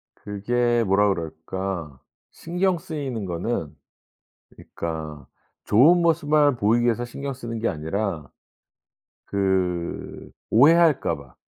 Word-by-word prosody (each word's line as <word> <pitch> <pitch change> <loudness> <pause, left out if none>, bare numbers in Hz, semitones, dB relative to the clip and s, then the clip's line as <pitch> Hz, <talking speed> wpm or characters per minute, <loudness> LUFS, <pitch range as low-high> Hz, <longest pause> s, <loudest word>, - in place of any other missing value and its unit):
그게 120 +4 0
뭐라 100 +1 +3
그럴까 85 -2 -4 0.3
신경 180 +2 -1
쓰이는 145 - -5
거는 85 -3 -3 0.8
그니까 80 -4 -7 0.4
좋은 160 +11 +5
모습만을 150 -4 +3
보이기 115 +2 +2
위해서 120 0 +1
신경 140 +3 -5
쓰는 115 -2 -6
게 115 +1 0
아니라 80 -1 -3 1.0
그 95 -3 -2 0.2
오해할까 155 +5 +4
봐. 70 -3 -15
110 Hz, 225 characters per minute, -24 LUFS, 85-140 Hz, 1.0 s, 좋은